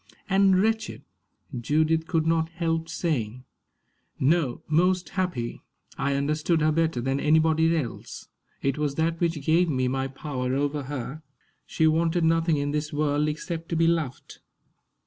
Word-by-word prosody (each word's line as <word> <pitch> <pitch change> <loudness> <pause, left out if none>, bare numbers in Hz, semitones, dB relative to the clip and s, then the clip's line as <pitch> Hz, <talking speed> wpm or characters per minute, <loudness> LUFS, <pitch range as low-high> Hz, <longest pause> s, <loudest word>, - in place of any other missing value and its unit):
"And 195 -1 +4
wretched!" 220 +2 -1 0.5
Judith 155 +6 +1
could 160 -2 +1
not 160 0 +1
help 165 -1 -2
saying. 125 -9 -2 0.8
"No 145 -2 +1
most 180 +3 +2
happy. 180 -11 -3 0.3
I 140 0 -1
understood 155 +4 +1
her 155 +1 +3
better 160 -4 +1
than 135 +2 -1
anybody 160 +2 +3
else. 130 -7 -6 0.4
It 135 +1 0
was 145 -2 -1
that 165 +1 0
which 165 -5 -1
gave 170 +2 +3
me 130 -3 0
my 135 +1 -1
power 135 -2 -3
over 145 0 -1
her. 140 +2 -5 0.5
She 160 - +1
wanted 165 +2 +2
nothing 165 -1 +2
in 145 0 -1
this 150 +1 -2
world 150 0 +1
except 165 +2 -5
to 170 - -1
be 165 0 +3
loved." 165 -6 -2
155 Hz, 145 wpm, -26 LUFS, 140-165 Hz, 0.8 s, And